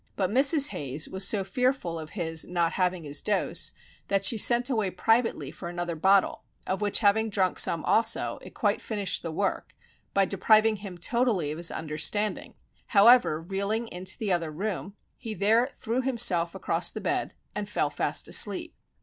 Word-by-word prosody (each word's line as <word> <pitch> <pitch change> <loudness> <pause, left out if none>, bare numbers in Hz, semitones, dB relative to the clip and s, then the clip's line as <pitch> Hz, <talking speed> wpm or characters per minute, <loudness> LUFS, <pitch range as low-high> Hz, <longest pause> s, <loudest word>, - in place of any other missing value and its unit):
But 190 -1 -1
Mrs. 280 +4 +6
Hayes 145 +2 -2
was 190 +1 +1
so 200 -3 +2
fearful 195 -4 -1
of 155 -1 -8
his 165 -3 -1
not 170 -2 -1
having 180 -2 -1
his 145 0 -3
dose, 205 -2 -1 0.4
that 195 0 0
she 230 - +5
sent 240 +3 +3
away 220 -7 -1
privately 225 +6 0
for 170 - -8
another 175 -1 -4
bottle, 190 +4 +2 0.2
of 190 +2 -3
which 205 +1 +1
having 220 +1 +2
drunk 190 -3 0
some 165 -2 +1
also, 230 +1 +1
it - - -13
quite - - 0
finished 200 -4 -2
the 165 - -5
work, 190 +4 -3 0.4
by 195 0 +4
depriving 215 +3 +3
him 195 -3 -9
totally 210 - 0
of 155 - -6
his 170 - +4
understanding; 160 +7 -2 0.3
however, 220 -5 +5
reeling 200 +6 -3
into 180 +1 -4
the 210 -3 -3
other 170 -2 -2
room, 195 +4 -5 0.2
he 220 -2 -6
there 225 +5 +2
threw 250 -2 -3
himself 220 -10 +1
across - - +1
the - - -5
bed - - -2 0.2
and - - -5
fell - - -1
fast - - -2
asleep. - - 0
195 Hz, 175 wpm, -27 LUFS, 175-225 Hz, 0.4 s, Mrs